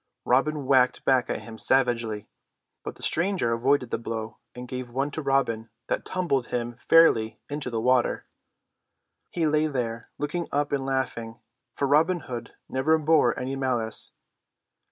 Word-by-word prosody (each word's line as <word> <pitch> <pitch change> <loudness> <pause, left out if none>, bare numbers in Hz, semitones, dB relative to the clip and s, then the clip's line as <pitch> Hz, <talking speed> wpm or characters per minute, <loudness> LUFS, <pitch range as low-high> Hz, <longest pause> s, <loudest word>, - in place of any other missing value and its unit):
Robin 140 +3 +2
whacked 130 -2 +3
back 130 -2 +3
at - - -3
him 110 -1 -10
savagely, 120 -5 +1 0.6
but - - -6
the - - -8
stranger 170 -9 +1
avoided 125 +1 +1
the - - -1
blow 115 -1 -5 0.2
and 125 0 -7
gave 125 0 -5
one 135 +4 -1
to 160 - -4
Robin 135 -5 0 0.2
that - - -1
tumbled 150 -9 -1
him 120 -1 -3
fairly 120 -7 +4
into 145 -2 -4
the 115 -2 -2
water. 125 +1 +2 1.0
He 170 -2 -1
lay 155 0 +2
there 115 -5 -3
looking 155 +4 -2
up 145 +1 0
and 135 -1 -1
laughing, 120 -4 -2 0.4
for 140 - 0
Robin 160 +5 +3
Hood 120 -4 -7
never 155 +5 +2
bore 155 -5 +3
any 130 +2 -3
malice. 125 -5 -2
130 Hz, 155 wpm, -26 LUFS, 120-145 Hz, 1.0 s, fairly